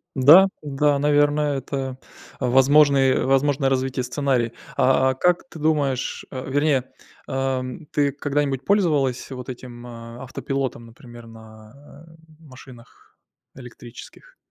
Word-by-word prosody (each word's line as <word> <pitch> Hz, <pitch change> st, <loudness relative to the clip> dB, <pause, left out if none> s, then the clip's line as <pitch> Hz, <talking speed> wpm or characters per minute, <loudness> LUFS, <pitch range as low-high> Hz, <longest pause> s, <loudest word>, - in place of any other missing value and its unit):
Да, 150 Hz, +9 st, +7 dB, 0.2 s
да, 145 Hz, 0 st, +1 dB
наверное, 145 Hz, 0 st, +2 dB
это 135 Hz, -1 st, -5 dB, 0.4 s
возможный 135 Hz, +1 st, +4 dB
возможное 135 Hz, +1 st, +1 dB
развитие 130 Hz, -1 st, -1 dB
сценария. 125 Hz, -2 st, -1 dB, 0.2 s
А, 130 Hz, 0 st, +3 dB
а -, -, +1 dB
как 180 Hz, -, 0 dB
ты 165 Hz, -, -11 dB
думаешь, 145 Hz, -4 st, -1 dB
а, 130 Hz, -, -5 dB
вернее, 145 Hz, -2 st, +1 dB, 0.4 s
ам, 135 Hz, +2 st, -3 dB
ты 145 Hz, -1 st, +1 dB
когда-нибудь 140 Hz, -1 st, -2 dB
пользовалась 150 Hz, -11 st, +1 dB
вот 125 Hz, -1 st, -8 dB
этим, 120 Hz, -1 st, -9 dB
а, 115 Hz, 0 st, -10 dB
автопилотом, 130 Hz, -2 st, -4 dB
например, 120 Hz, -1 st, -14 dB
на, 115 Hz, +7 st, -16 dB
э, 160 Hz, -, -18 dB, 0.2 s
машинах 130 Hz, -5 st, -16 dB, 0.4 s
электрических? 125 Hz, -, -13 dB
135 Hz, 115 wpm, -22 LUFS, 125-145 Hz, 0.4 s, Да